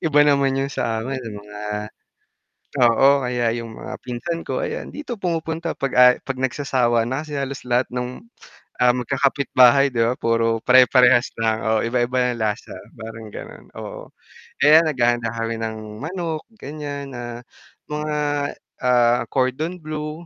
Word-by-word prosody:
Iba 150 -2 +4
naman 140 -2 +3
yung 140 - -4
sa 115 -3 -1
amin, 130 +1 -4
may 115 -4 -7
mga 105 0 -10 1.2
oo, 135 +4 +5
kaya 125 -1 -1
yung 115 -1 -6
mga - - -7
pinsan 125 +8 -4
ko - - -3
ayan, 470 +1 -5
dito 295 -5 -6
pumupunta 165 -1 -2
'pag 135 -1 -2
aya 125 0 +8
'pag 135 -1 -4
nagsasawa 125 -3 +1
na 130 +4 -2
kasi 150 -2 -6
halos 140 0 -4
lahat 120 0 +2
nung, 125 - -4 0.6
ah, 125 0 +6
magkakapitbahay, 135 +1 +3
di 115 -3 +1
ba, 120 - +2
puro 115 -1 +1
pare-parehas 125 0 +5
lang, 110 0 0
oo, 110 0 +2
iba-iba 125 +1 +1
yung - - -8
lasa 105 +1 -3 0.2
parang 110 -1 -9
ganon, - - -10
oo, - - -8 0.5
kaya 150 +2 +8
naghahanda 120 -4 +1
kami 115 0 -3
ng 110 -1 -3 0.2
manok 165 0 -4 0.2
ganyan, 145 -4 -6
ah, 120 0 -6 0.5
mga, 150 0 -2 0.7
ah, 120 -1 +3
cordon 140 +7 -1
blue 155 +1 -6
125 Hz, 150 wpm, -22 LUFS, 120-145 Hz, 1.2 s, aya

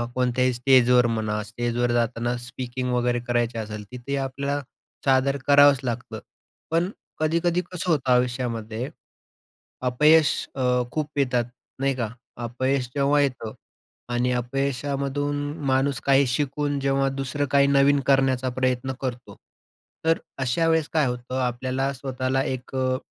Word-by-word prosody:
कोणत्याही 125 0 +1
स्टेजवर 125 0 +5
म्हणा, 110 -2 -1
स्टेजवर 120 +2 -1
जाताना 120 0 0
स्पीकिंग 125 +1 -4
वगैरे 120 0 +1
करायची 120 -1 0
असेल, 105 -1 -5
तिथे 125 +3 -4
आपल्याला 140 +2 -2 0.4
सादर 135 +1 +3
करावंच 145 -1 +7
लागतं. 120 -1 -4 0.5
पण 170 +3 +2 0.3
कधी-कधी 170 +3 +1
कसं 180 0 -4
होतं 130 -5 +1
आयुष्यामध्ये, 120 -1 -1 1.0
अपयश 150 +4 +5 0.2
अ, 135 - -3 0.3
खूप 155 -1 -2
येतात 125 -4 +1 0.3
नाही 135 0 +1
का. 120 -4 -2 0.3
अपयश 130 +2 -1
जेव्हा 140 +1 +3
येतं 125 -6 -2 0.6
आणि 125 +1 +1
अपयशामधून 140 +3 -1 0.3
माणूस 135 0 +1
काही 140 0 +5
शिकून 145 +2 -1
जेव्हा 135 0 +1
दुसरं 135 +2 -1
काही 140 0 +5
नवीन 140 0 +4
करण्याचा 135 -2 +3
प्रयत्न 130 0 -1
करतो, 125 -2 -5 0.7
तर 165 +1 +4 0.2
अशा 130 +5 +1
वेळेस 160 -2 +2
काय 155 -3 +3
होतं, 125 +1 -4
आपल्याला 130 +2 -1
स्वतःला 130 0 -2
एक 130 0 -5
अ, 130 0 +1
130 Hz, 125 wpm, -24 LUFS, 120-140 Hz, 1.0 s, करावंच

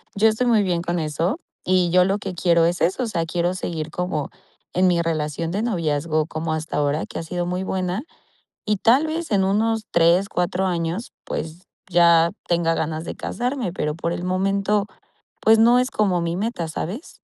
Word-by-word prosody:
yo 210 +2 +4
estoy 220 +3 0
muy 225 -3 +4
bien 175 -3 0
con 175 0 -2
eso, 165 - -1 0.3
y 180 -1 +3
yo 180 +1 +6
lo 195 +2 0
que 195 -2 -5
quiero 170 -1 +3
es 175 +1 0
eso, 185 +9 +1
o - - -1
sea, 170 -6 -1
quiero 175 +2 -1
seguir 165 -4 -4
como 180 -5 -2 0.4
en 185 +1 +3
mi 175 -1 +3
relación 160 0 -2
de 205 +5 -1
noviazgo 155 -6 0
como 160 0 -3
hasta 160 -1 -3
ahora 145 +1 0
que - - -6
ha - - -4
sido 175 +2 -3
muy 180 +1 -2
buena 190 +3 -2 0.6
y 210 0 +1
tal 255 +10 +4
vez 320 -2 -4
en 195 -2 +3
unos 220 +3 +1
3, 170 +3 +4
4 180 0 -1
años, 175 +4 -2
pues, 165 +3 -5 0.3
ya 170 -1 +5 0.2
tenga 170 -1 +2
ganas 160 0 -2
de - - -5
casarme, 245 -5 -3
pero 150 -4 -2
por 170 +1 -2
el 175 - -4
momento, 195 +2 +1 0.5
pues, 220 0 +5
no 235 +2 +6
es 255 - -1
como 190 -5 +1
mi 170 +1 -2
meta, 195 -5 -2
¿sabes? 190 - -6
180 Hz, 195 wpm, -22 LUFS, 165-205 Hz, 0.6 s, yo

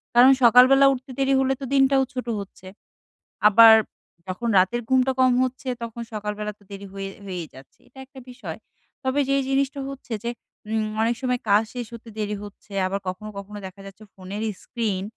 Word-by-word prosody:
কারণ 255 +3 +8
সকালবেলা 255 +3 +7
উঠতে 260 +1 -8
দেরি 270 0 +2
হলে 265 0 +2
তো 270 - -3
দিনটাও 270 0 +4
ছোটো 250 -2 -4
হচ্ছে। 190 -1 -11 0.8
আবার 225 +1 +9 0.5
যখন 185 +6 -4
রাতের 240 +6 +1
ঘুমটা 260 0 +3
কম 255 -1 +5
হচ্ছে, 255 +1 -5 0.2
তখন 235 0 -6
সকালবেলা 210 0 -4
তো - - -23
দেরি 200 0 -8
হয়ে 195 0 -5 0.2
হয়েই 180 -4 -5
যাচ্ছে 130 0 -16
এটা 265 - -16
একটা 270 0 -14
বিষয়। 250 - -8 0.5
তবে 260 +2 0
যেই 275 0 +2
জিনিসটা 275 +1 0
হচ্ছে 275 -3 -8
যে 235 - 0 0.4
উম 220 -1 0 0.2
অনেক 230 +1 +1
সময় 250 -1 0
কাজ 205 +2 +5
শেষ 245 -1 -4
হতে 230 0 -10
দেরি 210 0 -2
হচ্ছে। 205 0 -13
আবার 195 +2 -2
কখনো, 210 +4 -5
কখনো 205 +1 -8
দেখা 190 +1 -13
যাচ্ছে 195 +2 -12
ফোনের 195 +3 -7 0.2
স্ক্রিন 215 -6 -2
235 Hz, 180 wpm, -23 LUFS, 200-260 Hz, 0.8 s, আবার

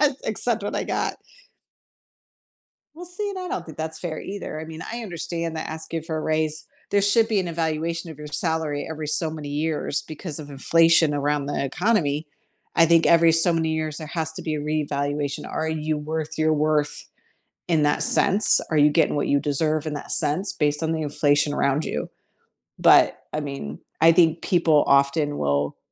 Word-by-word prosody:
Ac 295 -3 +3
accept 220 0 -1
what 205 - -4
I - - -2
got. - - -2 1.8
Well 345 +3 -9
see, 365 +4 -5
and 395 - -5
I 365 - -5
don't 175 - -4
think 160 - -11
that's 160 0 -5
fair 165 -3 -5
either, 195 -5 -6
I 160 - -6
mean, 160 0 -9
I 235 - -4
understand 170 -4 -4
that 155 - -4
asking 160 +1 -5
for 160 0 -4
a 155 - -2
raise 155 -1 -1 0.2
there 200 0 +2
should 220 +3 +4
be 215 -3 +1
an 180 - -4
evaluation 165 +1 -2
of 155 - -11
your 150 0 -8
salary 160 -2 -2
every, 155 -1 -5
so 160 +1 +1
many 155 -2 -7
years 150 0 -2
because 155 0 -6
of 150 -2 -9
inflation 165 +2 +3
around 145 0 -1
the 145 -1 -2
economy. 155 - 0 0.5
I 165 - +7
think 165 0 +4
every, 165 -1 +5
so 165 +2 +3
many 160 -1 0
years 155 -1 -2
there 155 -1 -6
has 160 0 -2
to - - -6
be 155 - -3
a 150 - -3
reevaluation 145 -1 -2
Are 160 - -2
you 155 -1 -2
worth 155 +1 -4
your 155 0 +2
worth 150 -1 0 0.6
in 160 -3 +2
that 145 - +1
sense? 205 +3 +5
Are 155 - +2
you 150 0 +6
getting 150 - +2
what 145 - -1
you 140 - +2
deserve 155 +2 0
in 155 - -3
that 145 - -4
sense 185 +8 +1
based 150 +1 0
on 160 - -1
the 160 - -2
inflation 145 0 +1
around 140 +1 +1
you? 75 - -4 0.7
But, - - +5 0.2
I 150 - -1
mean, 140 - -6 0.2
I 165 - +7
think 165 -1 +3
people 165 -5 +3
often 140 +2 +2
will 70 0 -1
155 Hz, 195 wpm, -23 LUFS, 150-165 Hz, 1.8 s, I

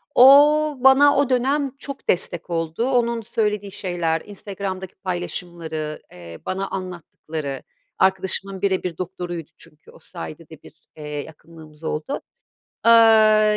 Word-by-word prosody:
O, 295 +3 +7
bana 270 +2 +6
o 280 -2 +2
dönem 270 +2 +1
çok 275 0 -7
destek 175 -1 +1
oldu. 165 +8 -2
Onun 235 -2 +1
söylediği 210 -3 -2
şeyler, 175 -5 -2
Instagram'daki 195 -2 -6
paylaşımları, 170 -4 -5
eee, 85 -2 -11
bana 195 +1 -2
anlattıkları, 160 -6 -6 0.4
arkadaşımın 190 0 0
bire 190 -2 0
bir 175 -3 -4
doktoruydu 175 -3 -6
çünkü, 150 - -14
o - - -18
sayede 80 -1 -9
de - - -14
bir, - - -15 0.2
eee, 150 -1 -8 0.2
yakınlığımız 160 0 -15
oldu. 160 - -3 0.6
Aaa, 220 -2 +6
190 Hz, 125 wpm, -22 LUFS, 165-230 Hz, 0.6 s, O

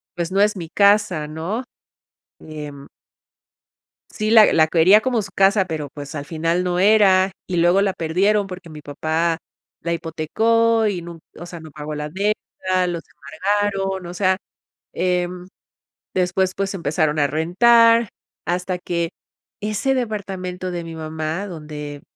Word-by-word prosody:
pues, 170 0 -3
no 195 +1 +2
es 210 0 +3
mi 165 -2 -6
casa, 200 -6 +3
¿no?, 170 +11 -4 0.8
em. 150 -3 -9 1.2
Sí, 215 0 -2
la 220 -2 +7
la 155 -1 +5
quería 175 +6 +5
como 240 -3 0
su 195 - -9
casa, 195 0 +4
pero, 155 -4 -4
pues, 145 +1 -8
al 145 -1 -4
final 165 +3 -1
no 180 0 -1
era, 195 -2 +5 0.2
y 180 - -3
luego 175 +3 +4
la 200 -1 +1
perdieron 195 +5 +1
porque 180 -2 -9
mi 155 -1 -9
papá 160 +3 -1 0.4
la 170 - -2
hipotecó 220 +8 +1
y 185 -5 -1
nun 170 -1 -9 0.2
o 175 - -8
sea, 170 -2 -9
no 160 -1 -11
pagó 150 0 -6
la 150 0 -4
deuda, 185 -1 -1
los 170 -2 -3
embargaron. 195 +4 -2
O 175 - -7
sea, 185 0 +2 0.6
em, 180 0 -1 0.7
después, 185 +1 +1
pues, 195 0 -2
empezaron 155 -3 0
a 145 - +3
rentar 230 +8 +4 0.4
hasta 180 +1 -1
que 170 -1 -2 0.5
ese 215 +6 0
departamento 190 -6 -4
de 175 -1 -4
mi 165 -1 -8
mamá 160 +4 -4
donde 150 -4 -7
180 Hz, 150 wpm, -21 LUFS, 160-200 Hz, 1.2 s, la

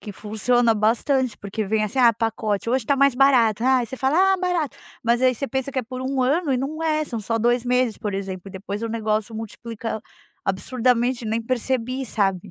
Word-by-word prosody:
que 210 - -8
funciona 225 +3 +1
bastante, 235 +4 +1
porque 205 +2 -4
vem 215 +2 0
assim: 225 +5 -3
"Ah, 235 -2 +6
pacote: 220 -1 -2
Hoje 255 -1 +1
tá 280 - +2
mais 275 -1 +4
barato". 245 -5 +4
Aí 255 -2 +3
você 260 - -7
fala: 360 +10 +3
"Ah, - - 0
barato". 360 -6 -1 0.3
Mas 235 +2 +2
aí 255 -1 +4
você 275 +4 -4
pensa 265 0 -2
que - - -1
é 255 - 0
por 255 +2 -7
1 265 0 -1
ano 290 +3 +1
e 255 - +1
não 310 +5 -4
é, 310 -1 +1
são 230 - -4
só 225 +3 -1
2 240 +2 +2
meses, 250 -2 +1
por 210 -3 -4
exemplo, 195 -2 -4
e - - -11
depois 200 +3 -6
o 230 - -2
negócio 220 0 -1
multiplica 225 0 -6 0.4
absurdamente, 240 +4 0
nem 220 +1 -1
percebi, 255 +2 -1
sabe. 195 -4 -1
240 Hz, 210 wpm, -23 LUFS, 220-260 Hz, 0.4 s, Ah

